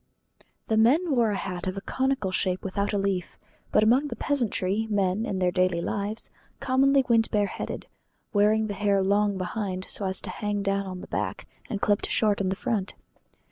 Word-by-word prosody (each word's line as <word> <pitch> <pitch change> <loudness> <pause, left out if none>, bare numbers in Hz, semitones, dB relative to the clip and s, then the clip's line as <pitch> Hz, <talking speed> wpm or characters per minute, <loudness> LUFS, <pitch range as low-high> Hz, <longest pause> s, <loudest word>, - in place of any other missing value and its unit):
The 220 - +1
men 295 +10 +4
wore 235 -3 +3
a 205 - 0
hat 185 -2 -4
of 185 +1 -3
a - - -3
conical 260 -5 -1
shape 185 0 0
without 200 +1 -1
a 205 - 0
leaf; 195 -3 -2 0.3
but - - +4
among 250 +7 +4
the - - -5
peasantry, 220 -6 0
men, 200 +2 +1
in 195 - -2
their 180 -1 +2
daily 180 -1 +1
life, 205 +5 -2 0.3
commonly 270 0 +3
went 230 -1 +3
bare 205 -1 +2
headed, - - -5 0.5
wearing 215 +1 +3
the 210 - -3
hair 200 -1 +1
long 200 +1 +2
behind 185 0 -3
so 200 - -3
as 190 0 +1
to - - -5
hang 205 -1 -2
down 195 0 0
on 185 -1 -6
the - - -9
back, - - -3 0.2
and 205 - -3
clipped 205 -1 +1
short 210 -2 +2
in 190 - 0
front. 200 -1 -2
205 Hz, 190 wpm, -26 LUFS, 190-220 Hz, 0.5 s, men